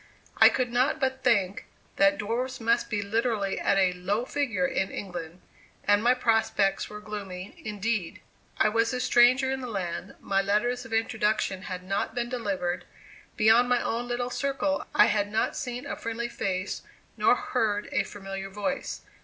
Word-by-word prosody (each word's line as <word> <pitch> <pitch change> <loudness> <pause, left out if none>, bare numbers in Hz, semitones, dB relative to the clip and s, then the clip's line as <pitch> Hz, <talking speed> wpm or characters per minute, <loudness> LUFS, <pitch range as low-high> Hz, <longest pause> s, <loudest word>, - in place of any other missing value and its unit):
I - - +9
could 255 -2 -1
not 255 +6 +2
but 265 -1 -1
think, 200 -6 +1 0.3
that 295 0 +4
dwarfs 245 +3 -2
must 230 +1 +1
be 205 -2 -1
literally 215 -1 0
at 195 - +2
a 185 -2 +3
"low 200 +6 -1
figure" 250 -11 0
in 190 +1 0
England, 175 -3 -7 0.4
and 205 0 +4
my 245 +2 +5
prospects 225 -5 +1
were 210 - -8
gloomy 200 -3 -7
indeed. 210 -3 -2 0.4
I - - +4
was 230 +2 +1
a 250 - -1
stranger 255 +2 +4
in 265 0 -2
the 250 - -5
land; 190 -2 -4
my 195 0 +1
letters 230 +5 0
of 230 - -11
introduction 220 -3 0
had 180 -1 -5
not 195 +4 -2
been 240 -1 -2
delivered; 195 -7 -2 0.5
beyond 230 +3 +5
my 245 -1 +3
own 235 +2 -2
little 245 0 -2
circle, 280 +2 -1
I - - +8
had 205 -1 0
not 220 - 0
seen 250 0 -4
a - - -4
friendly 230 +1 -4
face, 185 -3 -3 0.3
nor - - +4
heard 205 -2 -1
a - - +2
familiar 195 -1 -6
voice. 210 +8 -3
220 Hz, 170 wpm, -27 LUFS, 195-245 Hz, 0.5 s, I